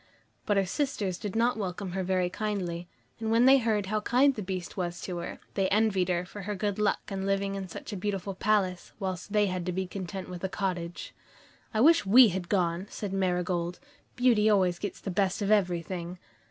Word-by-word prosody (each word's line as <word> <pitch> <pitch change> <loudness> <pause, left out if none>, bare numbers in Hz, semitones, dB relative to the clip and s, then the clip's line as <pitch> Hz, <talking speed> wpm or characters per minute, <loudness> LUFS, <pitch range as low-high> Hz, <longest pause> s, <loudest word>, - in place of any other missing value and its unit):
But 205 - +2
her 195 - +3
sisters 200 -5 -2
did 205 -2 -5
not 235 +2 +2
welcome 190 -2 -4
her 190 +1 -2
very 185 -1 +1
kindly, 180 -4 -3 0.3
and 225 -1 -2
when 230 +2 +4
they 270 +1 +7
heard 220 -4 +1
how 215 +2 -1
kind 260 +6 +4
the 215 - -5
Beast 185 -2 -5
was 175 -2 -3
to 180 -2 -4
her, - - -6
they 195 -1 +1
envied 200 -3 +2
her 175 -1 +1
her 205 +2 -6
good 205 +1 -2
luck 210 - +1
in 195 -1 -3
living 195 0 0
in 195 -1 -4
a 210 - -6
beautiful 195 0 -3
palace, 190 -2 0
whilst 190 0 -4
they 210 0 +3
had 185 -2 -2
to - - +1
be 190 +1 -2
content 185 0 -6
with 180 0 -8
a 190 - 0
cottage. 180 -3 -3 0.6
"I 220 - +1
wish 330 +5 +6
we 225 +4 +8
had 180 -1 -4
gone," 180 -1 0
said 200 -3 -5
Marigold. 180 -2 -1 0.4
"Beauty 235 -4 +4
always 185 -4 +3
gets 205 - -5
the 195 - -4
best 190 +2 +1
of 200 - 0
everything." 180 -3 0
195 Hz, 200 wpm, -29 LUFS, 180-210 Hz, 0.6 s, we